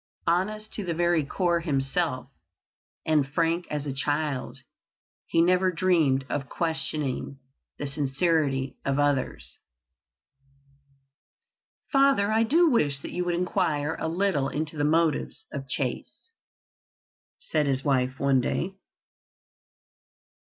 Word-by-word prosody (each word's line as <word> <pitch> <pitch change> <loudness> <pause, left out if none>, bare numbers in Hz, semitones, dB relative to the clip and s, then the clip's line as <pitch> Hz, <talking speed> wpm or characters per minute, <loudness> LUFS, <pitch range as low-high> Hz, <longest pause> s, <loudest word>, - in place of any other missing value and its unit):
Honest 215 +5 -1
to 210 - -4
the 170 -3 -2
very 170 -2 +2
core 170 +4 0
himself, 140 -2 -1 0.8
and 150 -3 +2
frank 165 +2 0
as 150 -1 -3
a 140 - -3
child, 145 0 -2 0.7
he 165 - +3
never 185 +1 +3
dreamed 160 -7 +2
of 135 +1 -3
questioning 140 -4 -2 0.4
the 145 - -4
sincerity 140 -1 0
of 140 0 0
others. 145 -3 -1 2.3
"Father, 275 -7 +4
I 220 +1 +3
do 320 +10 +4
wish 150 - +2
that - - -7
you 180 - -2
would 175 -1 0
inquire 160 -3 0
a - - -2
little 165 -5 0
into 155 +1 -3
the 145 - -1
motives 160 +6 +1
of 135 -2 -6
Chase," 460 - -3 1.1
said 150 -2 -1
his 135 -1 0
wife 130 -2 0
one 135 -2 +3
day. 180 +9 -2
155 Hz, 115 wpm, -26 LUFS, 140-175 Hz, 2.3 s, Father